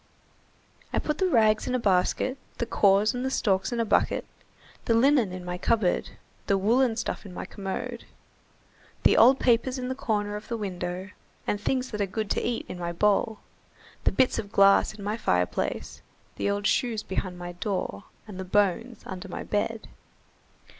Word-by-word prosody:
I -, -, -1 dB
put 300 Hz, 0 st, -1 dB
the 380 Hz, -, +3 dB
rags 215 Hz, -6 st, +3 dB
in 255 Hz, -, 0 dB
a -, -, +1 dB
basket, 210 Hz, +6 st, +1 dB, 0.2 s
the 235 Hz, -, -1 dB
cores 205 Hz, 0 st, +3 dB
and 255 Hz, +2 st, -2 dB
stalks 195 Hz, -3 st, +1 dB
in 240 Hz, -, -2 dB
a 230 Hz, -, +2 dB
bucket, -, -, +1 dB, 0.6 s
the 230 Hz, -, +3 dB
linen 250 Hz, -4 st, +4 dB
in 180 Hz, -1 st, -7 dB
my 180 Hz, 0 st, -4 dB
cupboard, 215 Hz, -5 st, 0 dB, 0.3 s
the 200 Hz, -, +3 dB
woollen 230 Hz, +4 st, +3 dB
stuff 225 Hz, -, -3 dB
in 200 Hz, -, -10 dB
my -, -, -5 dB
commode, 230 Hz, +5 st, -5 dB, 1.0 s
the -, -, +5 dB
old 260 Hz, +3 st, +6 dB
papers 250 Hz, +2 st, +2 dB
in 250 Hz, 0 st, -4 dB
the -, -, 0 dB
corner 210 Hz, -5 st, -1 dB
of 210 Hz, -, -7 dB
the 235 Hz, -, -3 dB
window, 185 Hz, -1 st, -4 dB, 0.3 s
the -, -, +1 dB
things 260 Hz, +4 st, -1 dB
that 210 Hz, -2 st, -3 dB
are 200 Hz, -, +1 dB
good 215 Hz, +2 st, -3 dB
to -, -, +1 dB
eat 240 Hz, -, -2 dB
in 180 Hz, -, -7 dB
my 170 Hz, -1 st, -2 dB
bowl, 210 Hz, +4 st, +1 dB, 0.6 s
the -, -, +4 dB
bits 260 Hz, -3 st, +2 dB
of 205 Hz, -2 st, -6 dB
glass 195 Hz, -2 st, +5 dB
in 205 Hz, -, -10 dB
my 210 Hz, +2 st, -2 dB
fireplace, 90 Hz, -, -1 dB, 0.3 s
the -, -, -1 dB
old 200 Hz, 0 st, -1 dB
shoes 230 Hz, -3 st, +1 dB
behind 185 Hz, -1 st, -3 dB
my 175 Hz, 0 st, -6 dB
door, 175 Hz, -, -3 dB, 0.2 s
and 195 Hz, -3 st, -8 dB
the -, -, -3 dB
bones 205 Hz, +5 st, 0 dB
under 185 Hz, 0 st, -7 dB
my 180 Hz, -, -6 dB
bed." 220 Hz, +2 st, -2 dB
210 Hz, 180 wpm, -27 LUFS, 190-235 Hz, 1.0 s, old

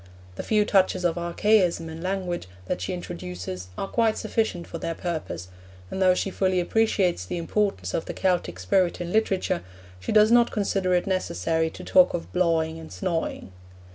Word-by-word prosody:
The -, -, -5 dB
few 210 Hz, -1 st, +2 dB
touches 190 Hz, -3 st, +2 dB
of 170 Hz, -, +2 dB
archaism 175 Hz, -1 st, +2 dB
in 160 Hz, 0 st, -7 dB
language 180 Hz, -, -2 dB, 0.2 s
that 90 Hz, -, -3 dB
she 95 Hz, -, -3 dB
introduces 90 Hz, +1 st, -6 dB
are 195 Hz, -, -2 dB
quite 225 Hz, +1 st, +1 dB
sufficient 220 Hz, -5 st, -1 dB
for 165 Hz, -, -7 dB
their 165 Hz, -, -3 dB
purpose, 155 Hz, -, -4 dB, 0.4 s
and 190 Hz, -, -3 dB
though 185 Hz, -1 st, +5 dB
she 195 Hz, -, -1 dB
fully 185 Hz, -1 st, +1 dB
appreciates 185 Hz, -, +1 dB
the 90 Hz, -, -4 dB
importance 170 Hz, -, -1 dB
of 165 Hz, -, -1 dB
the -, -, -5 dB
Celtic 175 Hz, -, 0 dB
spirit 170 Hz, -, +1 dB
in 175 Hz, 0 st, -4 dB
literature, 205 Hz, -, +1 dB, 0.4 s
she 95 Hz, -, -4 dB
does 215 Hz, +1 st, +6 dB
not 240 Hz, 0 st, +6 dB
consider 195 Hz, -3 st, 0 dB
it 175 Hz, -, +1 dB
necessary 160 Hz, -, 0 dB
to -, -, -10 dB
talk 185 Hz, -1 st, +5 dB
of 170 Hz, -, -6 dB
'blawing' 165 Hz, -2 st, +1 dB
and 160 Hz, -, -10 dB
'snawing.' 165 Hz, -, -3 dB
175 Hz, 175 wpm, -25 LUFS, 160-195 Hz, 0.4 s, does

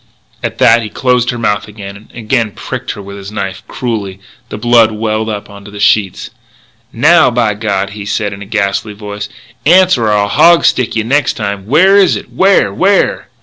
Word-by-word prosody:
At -, -, -4 dB
that 115 Hz, +1 st, +4 dB
he 110 Hz, -, -6 dB
closed 125 Hz, +1 st, 0 dB
her 120 Hz, -, -2 dB
mouth 105 Hz, -2 st, -1 dB
again, 100 Hz, -2 st, -9 dB
and 105 Hz, +2 st, -16 dB
again 115 Hz, 0 st, -1 dB
he 105 Hz, -, -16 dB
pricked -, -, -6 dB
her 100 Hz, -, -10 dB
with 100 Hz, +1 st, -9 dB
his 100 Hz, 0 st, -9 dB
knife, 100 Hz, -3 st, -5 dB
cruelly. 105 Hz, -6 st, -4 dB, 0.3 s
The -, -, -6 dB
blood 115 Hz, 0 st, +3 dB
welled 110 Hz, 0 st, -2 dB
up 105 Hz, -1 st, -5 dB
onto 100 Hz, 0 st, -12 dB
the 105 Hz, 0 st, -10 dB
sheets. 100 Hz, -2 st, +1 dB, 0.6 s
"Now, 155 Hz, +6 st, +4 dB
by 115 Hz, -3 st, 0 dB
God!" 100 Hz, -2 st, -2 dB
he 100 Hz, 0 st, -8 dB
said 105 Hz, 0 st, -2 dB
in 100 Hz, -, -10 dB
a -, -, -7 dB
ghastly 105 Hz, 0 st, -2 dB
voice, 105 Hz, 0 st, -7 dB, 0.3 s
"answer 175 Hz, -7 st, +4 dB
or 105 Hz, -, +1 dB
I'll 100 Hz, -1 st, +1 dB
hog 170 Hz, +11 st, +4 dB
stick 130 Hz, -3 st, +1 dB
yeh 110 Hz, -, 0 dB
next 135 Hz, +3 st, +1 dB
time! 100 Hz, -2 st, -5 dB
Where 185 Hz, -, +4 dB
is 195 Hz, -2 st, +4 dB
it? -, -, -8 dB
Where! 195 Hz, +1 st, +2 dB
where!" 195 Hz, +1 st, +1 dB
110 Hz, 200 wpm, -12 LUFS, 100-125 Hz, 0.6 s, that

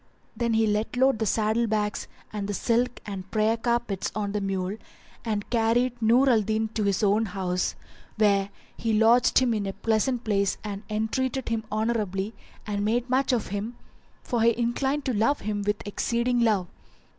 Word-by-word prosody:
Then 235 Hz, -2 st, 0 dB
he 220 Hz, 0 st, +3 dB
let 215 Hz, +3 st, -1 dB
load 265 Hz, -2 st, +3 dB
the 220 Hz, -, 0 dB
saddle 220 Hz, +3 st, +1 dB
bags 210 Hz, -1 st, -1 dB, 0.3 s
and 205 Hz, -2 st, -3 dB
the 205 Hz, -, -1 dB
silk 245 Hz, +3 st, 0 dB
and 195 Hz, -2 st, -6 dB
prayer 215 Hz, +1 st, +2 dB
carpets 235 Hz, -4 st, -1 dB
on 205 Hz, -2 st, -2 dB
the 210 Hz, 0 st, -2 dB
mule 195 Hz, +1 st, -2 dB, 0.5 s
and 210 Hz, -3 st, -2 dB
carried 240 Hz, +1 st, +1 dB
Nur 240 Hz, +5 st, +4 dB
al 235 Hz, -4 st, +5 dB
Din 220 Hz, +1 st, -1 dB
to 215 Hz, -1 st, -2 dB
his 200 Hz, 0 st, +1 dB
own 210 Hz, +2 st, +3 dB
house, 180 Hz, -2 st, -2 dB, 0.4 s
where 200 Hz, -2 st, +3 dB, 0.3 s
he 225 Hz, -1 st, -1 dB
lodged 230 Hz, +3 st, +4 dB
him 250 Hz, -3 st, +4 dB
in 205 Hz, -2 st, -2 dB
a 195 Hz, -, -3 dB
pleasant 230 Hz, +4 st, 0 dB
place 200 Hz, -2 st, +1 dB
and 205 Hz, -2 st, -5 dB
entreated 235 Hz, +5 st, -1 dB
him 225 Hz, -1 st, -2 dB
honourably 215 Hz, -2 st, -1 dB, 0.3 s
and 205 Hz, -1 st, -2 dB
made 240 Hz, +4 st, 0 dB
much 265 Hz, +2 st, +2 dB
of 240 Hz, -4 st, 0 dB
him, 205 Hz, +5 st, -4 dB, 0.5 s
for 240 Hz, -2 st, -1 dB
he 230 Hz, 0 st, +4 dB
inclined 265 Hz, +4 st, 0 dB
to 255 Hz, -, 0 dB
love 230 Hz, +7 st, +1 dB
him 205 Hz, 0 st, -2 dB
with 205 Hz, 0 st, -2 dB
exceeding 235 Hz, +4 st, 0 dB
love. 215 Hz, -6 st, +2 dB
220 Hz, 180 wpm, -26 LUFS, 205-235 Hz, 0.5 s, al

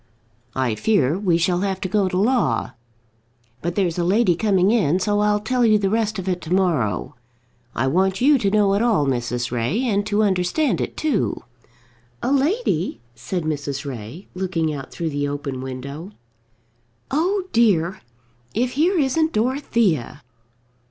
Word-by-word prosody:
I 130 Hz, -3 st, 0 dB
fear 155 Hz, -, +2 dB
we 180 Hz, -5 st, +2 dB
shall 175 Hz, +1 st, +1 dB
have 190 Hz, -1 st, -1 dB
to -, -, -1 dB
go 195 Hz, 0 st, +1 dB
to 180 Hz, -, -2 dB
law. 210 Hz, -, +1 dB, 0.9 s
But 170 Hz, +1 st, -3 dB
there's 180 Hz, -4 st, 0 dB
a -, -, +1 dB
lady 190 Hz, +2 st, +3 dB
coming 195 Hz, 0 st, +2 dB
in, 185 Hz, -7 st, +2 dB
so 205 Hz, +2 st, +1 dB
I'll 210 Hz, 0 st, +2 dB
tell 245 Hz, +4 st, 0 dB
you 215 Hz, -2 st, +5 dB
the 195 Hz, -2 st, 0 dB
rest 220 Hz, -1 st, 0 dB
of 190 Hz, -1 st, -5 dB
it 180 Hz, -1 st, -1 dB
to 160 Hz, -, -8 dB
morrow. 165 Hz, -, 0 dB, 0.6 s
I 130 Hz, -, 0 dB
want 190 Hz, +7 st, +1 dB
you 280 Hz, +2 st, +4 dB
to 200 Hz, -, +1 dB
know 205 Hz, -1 st, +3 dB
it 200 Hz, -, +1 dB
all, 225 Hz, -11 st, +2 dB
Mrs. 125 Hz, -2 st, -2 dB
Ray, 125 Hz, -, 0 dB
and 205 Hz, -5 st, +1 dB
to 210 Hz, +1 st, +2 dB
understand 195 Hz, -, +1 dB
it -, -, -4 dB
too." 295 Hz, -10 st, -1 dB, 0.8 s
"A -, -, 0 dB
lady!" 280 Hz, -, 0 dB
said 140 Hz, +10 st, -4 dB
Mrs. 145 Hz, -2 st, -3 dB
Ray, 130 Hz, -, -7 dB
looking 175 Hz, -4 st, -1 dB
out 135 Hz, -2 st, -7 dB
through 165 Hz, -2 st, -3 dB
the 145 Hz, 0 st, -1 dB
open 140 Hz, -2 st, -4 dB
window. 140 Hz, +6 st, -7 dB, 1.0 s
"Oh 365 Hz, +8 st, +1 dB
dear, 190 Hz, -7 st, +2 dB, 0.5 s
if 245 Hz, +3 st, +1 dB
here 340 Hz, +8 st, +2 dB
isn't 315 Hz, +2 st, +1 dB
Dorothea!" 220 Hz, -, 0 dB
190 Hz, 160 wpm, -22 LUFS, 150-220 Hz, 1.0 s, you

